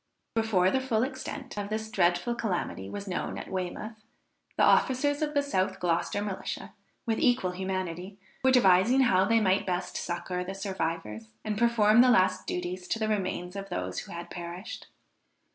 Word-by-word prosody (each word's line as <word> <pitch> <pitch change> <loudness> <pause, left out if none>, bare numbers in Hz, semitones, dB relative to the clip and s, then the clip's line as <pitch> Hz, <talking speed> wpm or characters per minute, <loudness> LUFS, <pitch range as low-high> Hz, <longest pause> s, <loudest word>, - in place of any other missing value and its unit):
Before 210 -5 +2
the 265 - +1
full 235 -4 +1
extent 265 -2 -5
of 205 0 -4
this 220 0 -3
dreadful 175 +3 +2
calamity 180 - -3
was 200 0 -6
known 185 - -3
at - - -7
Weymouth, 210 +4 -4 0.5
the - - +4
officers 285 +3 +3
of 300 -1 -1
the 285 - +3
South 190 -10 0
Gloucester 175 +4 0
Militia, 200 -2 -5 0.3
with 225 -2 0
equal 240 -8 +2
humanity, 185 0 -4 0.3
were 260 - +5
devising 240 +1 +5
how 190 -7 +4
they 230 +2 +4
might 195 -2 +2
best 180 0 -2
succour 180 +1 -3
the 190 +2 -6
survivors, 165 - -3 0.2
and 215 - -1
perform 225 0 +5
the 255 - +6
last 185 -4 +3
duties 180 +1 -3
to - - 0
the 220 -1 -1
remains 185 -3 -2
of 195 0 -6
those 90 0 -3
who - - -9
had 170 0 -7
perished. 175 +5 -7
195 Hz, 170 wpm, -29 LUFS, 180-230 Hz, 0.5 s, the